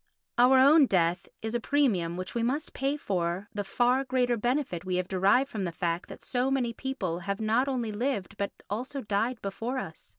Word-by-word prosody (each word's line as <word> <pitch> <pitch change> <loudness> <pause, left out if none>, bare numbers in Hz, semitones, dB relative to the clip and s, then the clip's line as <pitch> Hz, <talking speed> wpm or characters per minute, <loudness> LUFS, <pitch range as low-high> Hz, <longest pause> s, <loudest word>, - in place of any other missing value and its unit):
Our 255 +2 +7
own 280 +2 +7
death 175 -2 +1
is 220 0 -3
a 240 - +1
premium 220 -12 +1
which 185 0 -5
we 235 - -1
must 270 +7 -1
pay 275 +2 -1
for 185 -4 -2
the 205 - -2
far 245 +6 +2
greater 250 -2 +1
benefit 240 - -1
we 185 -1 -2
have 180 0 -1
derived 195 +9 +3
from 210 -3 -3
the 175 - -2
fact 170 0 -2
that - - -10
so 255 +1 0
many 255 -3 0
people 220 -10 -3
have 200 +2 -3
not 225 +5 +2
only 245 -5 -1
lived 210 -4 -2
but 200 - -2 0.2
also 255 +7 -4
died 220 +3 -1
before 225 +6 -3
us. 160 -11 -7
230 Hz, 200 wpm, -28 LUFS, 190-260 Hz, 0.2 s, Our